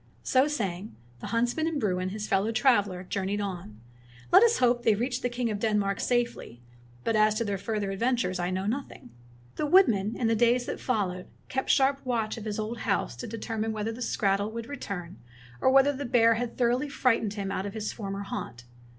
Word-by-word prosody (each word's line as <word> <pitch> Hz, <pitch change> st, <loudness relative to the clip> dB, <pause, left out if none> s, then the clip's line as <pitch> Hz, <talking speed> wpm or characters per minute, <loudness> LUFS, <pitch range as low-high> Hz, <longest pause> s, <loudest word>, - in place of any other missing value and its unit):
So 260 Hz, +2 st, +3 dB
saying, 205 Hz, -8 st, -3 dB, 0.2 s
the -, -, -7 dB
huntsman 240 Hz, +7 st, 0 dB
and 325 Hz, -3 st, -1 dB
Bruin, 185 Hz, -5 st, 0 dB
his 210 Hz, +2 st, -5 dB
fellow 195 Hz, +3 st, +1 dB
traveler, 205 Hz, -7 st, +2 dB
journeyed 195 Hz, +2 st, -2 dB
on. 175 Hz, -, -5 dB, 0.5 s
Let -, -, +8 dB
us 470 Hz, 0 st, +5 dB
hope 240 Hz, -1 st, +3 dB
they 225 Hz, -3 st, +3 dB
reached 245 Hz, +4 st, -2 dB
the 245 Hz, -, 0 dB
king 240 Hz, -1 st, -2 dB
of 205 Hz, -, -3 dB
Denmark 205 Hz, -2 st, 0 dB
safely, 235 Hz, -, -2 dB, 0.4 s
but 225 Hz, -, 0 dB
as 215 Hz, 0 st, +4 dB
to 230 Hz, -, 0 dB
their 200 Hz, -2 st, -2 dB
further 210 Hz, -1 st, -2 dB
adventures 195 Hz, -3 st, 0 dB
I 175 Hz, 0 st, -1 dB
know 185 Hz, +1 st, -2 dB
nothing. 230 Hz, -, -5 dB, 0.5 s
The 300 Hz, -, 0 dB
woodman, 230 Hz, -, +4 dB
in 245 Hz, -, -2 dB
the 225 Hz, 0 st, +3 dB
days 240 Hz, +2 st, +3 dB
that -, -, -4 dB
followed, 190 Hz, -7 st, -2 dB, 0.2 s
kept 265 Hz, 0 st, -2 dB
sharp 275 Hz, 0 st, +3 dB
watch 230 Hz, -4 st, -1 dB
of 225 Hz, -, -8 dB
his 210 Hz, -1 st, -3 dB
old 220 Hz, +2 st, -4 dB
house 200 Hz, -, -1 dB
to -, -, -6 dB
deter 225 Hz, 0 st, -5 dB
mine 220 Hz, +1 st, -1 dB
whether 215 Hz, +1 st, -2 dB
the 230 Hz, +2 st, -8 dB
skrattel 200 Hz, -2 st, 0 dB
would 230 Hz, 0 st, -5 dB
return, 195 Hz, -10 st, -6 dB, 0.4 s
or -, -, +4 dB
whether 270 Hz, +2 st, +5 dB
the 280 Hz, +1 st, -5 dB
bear 230 Hz, -1 st, +4 dB
had 235 Hz, +1 st, -4 dB
thoroughly 250 Hz, +4 st, +1 dB
frightened 230 Hz, -6 st, +1 dB
him 195 Hz, -2 st, -3 dB
out 195 Hz, 0 st, -2 dB
of 200 Hz, -, -8 dB
his 215 Hz, -1 st, -3 dB
former 200 Hz, -2 st, -5 dB
haunt. 120 Hz, -10 st, -6 dB
220 Hz, 205 wpm, -28 LUFS, 200-245 Hz, 0.5 s, Let